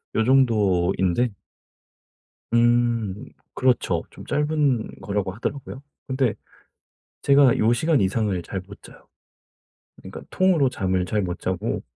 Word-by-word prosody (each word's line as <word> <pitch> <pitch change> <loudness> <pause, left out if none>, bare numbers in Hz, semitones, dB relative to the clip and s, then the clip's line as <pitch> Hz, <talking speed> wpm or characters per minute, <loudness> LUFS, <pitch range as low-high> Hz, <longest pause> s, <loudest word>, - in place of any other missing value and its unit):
요 110 - +2
정도인데 105 -4 +2 1.2
음 120 -3 +1 0.3
그렇죠. 130 -2 +1
좀 - - -12
짧은 150 -5 0
거라고 100 -2 -2
하더라고요. 130 +4 -6 0.3
근데 130 -3 0 0.9
제가 140 -3 +5
요 115 +2 +3
시간 155 +2 +2
이상을 100 -1 0
잘 95 +2 -5
못 100 +2 -14
자요. - - -16 0.9
그러니까 - - -10
통으로 180 -7 +3
잠을 95 -6 -1
잘 105 -1 -1
못 90 -1 -4
자고 95 -1 -3
115 Hz, 235 characters per minute, -23 LUFS, 95-130 Hz, 1.2 s, 제가